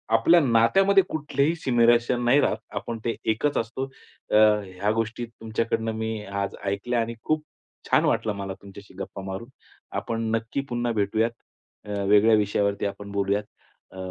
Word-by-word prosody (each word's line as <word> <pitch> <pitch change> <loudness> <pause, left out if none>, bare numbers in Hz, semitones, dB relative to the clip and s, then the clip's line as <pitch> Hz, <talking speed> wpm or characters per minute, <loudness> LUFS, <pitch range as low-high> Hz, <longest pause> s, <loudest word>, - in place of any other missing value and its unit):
आपल्या 165 +10 +6
नात्यामध्ये 170 +10 +4
कुठलेही 150 0 0
सिमिरेशन 120 -3 +3
नाही 130 +4 +5
राहत. - - +1 0.2
आपण 115 - -4
ते 115 - 0 0.2
एकच 140 +7 0
असतो 115 +4 -2 0.5
अ, - - +3 0.3
ह्या 95 +3 -2
गोष्टी 115 +1 -2
तुमच्याकडनं 115 0 -2
मी 110 -1 -3
आज 100 0 -3
ऐकल्या 100 +5 -1
आणि 115 +1 -3
खूप 155 0 0 0.5
छान - - +4
वाटलं 110 - +1
मला 100 -1 -5
तुमच्याशी 100 0 -13
गप्पा 100 - -6
मारून. 95 +6 -6 0.5
आपण 115 -1 -3
नक्की 115 +4 -2
पुन्हा 120 -1 -1
भेटूयात 110 +2 +1 0.5
अ, 105 -1 -3
वेगळ्या 105 +2 +6
विषयावरती 100 -1 0
आपण 100 0 -5
बोलूयात 100 +1 0 0.5
अ, - - -13
115 Hz, 150 wpm, -25 LUFS, 100-120 Hz, 0.5 s, आपल्या